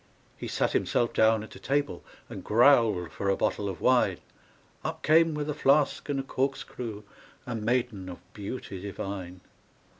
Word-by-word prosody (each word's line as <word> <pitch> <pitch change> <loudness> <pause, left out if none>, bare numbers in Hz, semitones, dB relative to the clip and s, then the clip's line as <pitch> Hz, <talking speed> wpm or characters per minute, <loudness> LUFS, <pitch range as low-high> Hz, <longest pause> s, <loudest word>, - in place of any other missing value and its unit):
He - - -6
sat - - 0
himself 120 -1 +1
down 110 -1 +4
at 110 - -11
a - - -11
table, 140 -8 -1 0.2
And - - -8
growled 115 - +4
for 100 - -2
a 95 - +2
bottle 100 -1 0
of 95 - -7
wine; 125 -8 +3 0.7
Up - - -4
came 160 0 +4
with 150 0 -3
a 150 - -1
flask 145 +1 +2
and 140 -1 0
a - - -2
corkscrew 125 -5 -3 0.4
A 120 - -4
maiden 115 -4 -1
of 90 - -7 0.2
beauty 100 -2 -6
divine. 95 -2 -6
115 Hz, 160 wpm, -28 LUFS, 100-135 Hz, 0.7 s, down